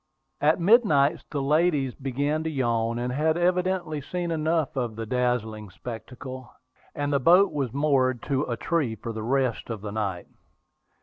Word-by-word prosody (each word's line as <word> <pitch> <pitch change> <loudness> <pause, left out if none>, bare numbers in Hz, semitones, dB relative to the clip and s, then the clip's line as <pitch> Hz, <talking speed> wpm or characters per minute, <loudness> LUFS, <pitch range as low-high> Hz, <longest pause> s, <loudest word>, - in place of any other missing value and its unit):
At 155 +3 +3
midnight, 170 - +4
the 140 -2 -2
ladies 150 -3 +2
began 145 +4 -2
to - - 0
yawn, 115 -5 0
and 125 +1 -2
had 155 +4 +1
evidently 180 -3 0
seen 175 +4 -3
enough 160 -1 0
of 120 -4 -2
the 115 0 -4
dazzling 110 -3 -1
spectacle; 125 +4 -8 0.4
and 145 0 -1
the 140 - +3
boat 180 +8 +5
was 140 -6 -2
moored 135 -3 +1
to 135 -2 0
a 120 - -2
tree 150 -10 0
for 115 +1 -6
the 110 - -5
rest 125 0 0
of 110 -3 -4
the 105 -1 -5
night. 100 -4 -3
135 Hz, 165 wpm, -26 LUFS, 120-155 Hz, 0.4 s, boat